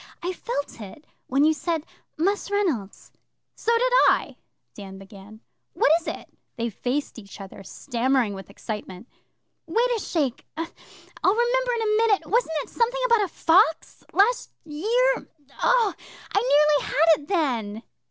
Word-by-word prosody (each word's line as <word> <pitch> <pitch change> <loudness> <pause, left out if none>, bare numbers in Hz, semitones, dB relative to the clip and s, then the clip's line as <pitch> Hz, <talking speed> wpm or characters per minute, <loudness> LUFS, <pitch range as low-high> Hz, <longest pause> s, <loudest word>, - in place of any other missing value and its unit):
I 360 +1 -2
felt 285 - -5
it 210 +9 -11 0.2
when 270 +2 +2
you 315 +1 +5
said 320 +1 -2 0.3
"Mus' 395 +6 0
Reynolds."' 330 - -2 0.4
'So 460 - -1
did - - +1 0.2
I,' - - 0 0.4
Dan 195 -2 -10
began. 200 +2 -13 0.3
'What - - +3
is - - -14
it?' - - -6 0.2
They 235 -1 -2
faced 250 +4 -3
each 200 -1 -13
other, 195 0 -10
stammering 245 0 -1
with 195 -2 -9
excitement. 210 -1 -7 0.6
'Wait 465 +9 +1
a - - -2
shake! 290 - -2
I'll 330 +1 -4 0.6
remember - - +1
in 460 - -2
a 425 -1 +2
minute. 445 -3 +2
Wasn't 455 -5 +1
it - - -15
something 485 +1 0
about 465 -4 +4
a - - -6
fox 325 -1 +2
last 465 +5 +2 0.2
year? 460 +12 0 0.3
Oh, 485 -5 +3 0.4
I 350 -9 +4
nearly - - -6
had 320 +1 +4
it 290 - -15
then! 240 - -1
320 Hz, 150 wpm, -24 LUFS, -, 0.6 s, you